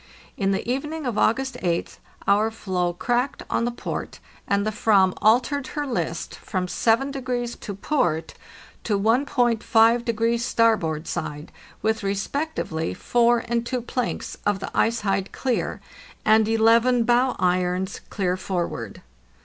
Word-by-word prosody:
In 195 -1 0
the 195 +2 -1
evening 295 +5 -2
of 245 -4 -1
August 265 +2 +1
8th 170 -2 -2 0.3
our 210 +2 +4
floe 185 -5 -2
cracked 245 +9 -1
on 235 - +1
the 240 - 0
port, 240 - -5 0.3
and 200 0 +1
the 215 - 0
"vam 200 -3 +3
altered 250 +5 +2
her 295 - 0
list 255 -4 -3
from 185 -2 -3
7 230 +8 +1
to 245 -5 -4
port 175 - 0 0.5
to 205 -3 0
1.5° 230 -1 +2
starboard 215 -10 +1
side, 150 +2 -5 0.3
with 220 +1 +1
respectively 200 - -2
four 240 0 +2
and 235 0 0
two 245 0 -3
planks 250 0 -3
of 205 -1 +1
the 195 - -7
ice 230 0 +2
hide 195 -1 -1
clear, 255 -3 -2 0.5
and 220 0 +5
eleven 230 +2 +4
bow 245 +2 +3
irons 180 +1 0
clear 185 -3 0
forward. 175 - -4
225 Hz, 135 wpm, -24 LUFS, 195-245 Hz, 0.5 s, and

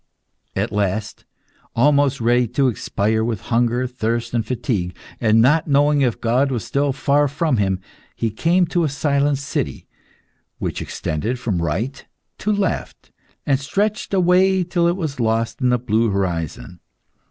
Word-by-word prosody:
At - - -1
last, 105 +1 -2 0.5
almost 140 +2 +3
ready 120 +1 +2
to 130 +4 +1
expire 110 -1 -1
with 115 -3 -2
hunger, 120 +2 +2
thirst, 120 -2 -2
and 115 -2 +1
fatigue, 110 -7 -2 0.2
and 115 -1 +4
not 150 +6 +3
knowing 145 0 +3
if 125 -4 +1
God 125 +4 +2
was 120 -5 -3
still 140 0 0
far 140 +2 +2
from 145 -1 0
him, 95 -2 +1 0.4
he 115 - -1
came 170 - +2
to 175 0 0
a 155 - +1
silent 140 0 +1
city 140 +1 -3 0.7
which - - -3
extended 110 +12 -3
from 105 -8 -2
right 95 - -2 0.4
to 210 - 0
left, 200 -4 -2 0.3
and 135 -2 +2
stretched 205 +10 -1
away 185 0 +3
till 175 0 +1
it 175 +2 +1
was 155 -7 -4
lost 115 +2 0
in 125 - +3
the 125 - +3
blue 115 -1 +1
horizon. 90 -2 -3
125 Hz, 155 wpm, -21 LUFS, 110-145 Hz, 0.7 s, and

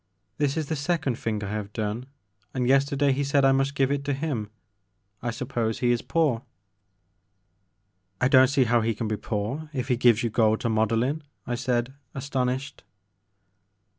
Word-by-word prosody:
This 145 +1 +1
is 160 - 0
the 160 - -2
second 145 -4 -1
thing 105 -2 -2
I 100 - -4
have 105 -1 -4
done 110 +3 -3 0.5
and 125 -1 0
yesterday 140 +1 +3
he 140 +2 0
said 140 0 +3
I 135 - +6
must 135 +1 +1
give 135 0 +2
it 140 0 -1
to 140 -1 0
him. 135 -8 -3 0.7
I 120 - -2
suppose 115 -2 -2
he 120 -1 +2
is 120 - +1
poor." 150 -9 +1 1.8
I 130 - +3
don't 130 0 +7
see 135 0 +3
how 120 -1 +3
he 115 0 0
can 115 - -3
be 110 - 0
poor 115 +10 -3
if 130 -1 -3
he 125 - +2
gives 120 -2 +4
you 115 - 0
gold 110 -1 +3
to 115 - 0
model 110 +1 +2
in," 145 +5 -1 0.2
I 120 - -3
said, 120 0 -1 0.2
astonished. 135 0 -2
125 Hz, 180 wpm, -26 LUFS, 115-140 Hz, 1.8 s, don't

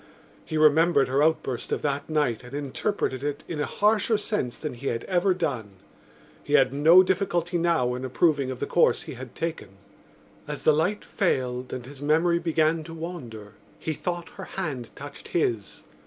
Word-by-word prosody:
He 155 - -3
remembered 155 -1 +5
her 135 +2 +2
outburst 150 -5 0
of - - -1
that 145 +1 -2
night 150 -8 +1
and 125 +3 -9
interpreted 140 -1 -2
it 145 0 -3
in 160 - -4
a 145 - 0
harsher 215 +1 +2
sense 205 - -2
than 150 -3 -5
he 130 +3 -7
had 115 -1 -1
ever 185 0 +2
done. 125 - -3 0.7
He - - -4
had - - +5
no 160 +6 +7
difficulty 175 -2 0
now 165 -8 +2
in 125 +1 -5
approving 140 +1 +1
of 130 -1 -5
the - - -1
course 170 - +3
he - - -7
had 125 -1 -10
taken. 160 - -5 0.7
As - - -5
the 155 - +5
light 180 +8 0
failed 130 - -1
and 125 -2 -5
his 140 +1 -11
memory 165 +4 +3
began 160 -1 +1
to 165 0 -8
wander 120 - -7 0.2
he 160 - -3
thought 175 +1 -4
her - - -9
hand 140 -11 -3
touched 145 +1 -9
his. 115 - -1
150 Hz, 180 wpm, -26 LUFS, 130-170 Hz, 0.7 s, no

